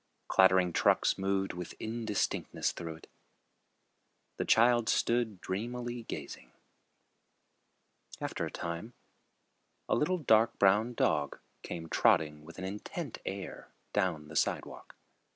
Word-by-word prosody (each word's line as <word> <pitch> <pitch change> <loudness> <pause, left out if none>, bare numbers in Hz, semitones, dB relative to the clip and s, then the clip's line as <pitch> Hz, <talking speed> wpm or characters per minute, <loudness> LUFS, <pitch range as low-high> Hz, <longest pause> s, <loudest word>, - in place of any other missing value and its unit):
Clattering 95 -2 +5
trucks - - +3
moved 95 0 0
with 90 -1 -7
indistinctness 110 -2 -1
through 80 -2 -6
it. 80 - -15 1.3
The - - -1
child 120 0 +4
stood 115 -5 +1
dreamily 120 +4 -4
gazing. - - -7 1.7
After - - -3
a - - -8
time, 85 +8 -5 0.9
a - - +1
little 185 +5 +2
dark 115 -8 +3
brown 105 +5 +3
dog 70 -8 +1 0.2
came 80 -1 -6
trotting 75 -1 +2
with 85 +2 -12
an 95 - -5
intent 105 - -5
air 95 0 -5 0.3
down 90 -7 0
the 80 - -10
sidewalk. - - -2
100 Hz, 115 wpm, -32 LUFS, 85-115 Hz, 1.7 s, Clattering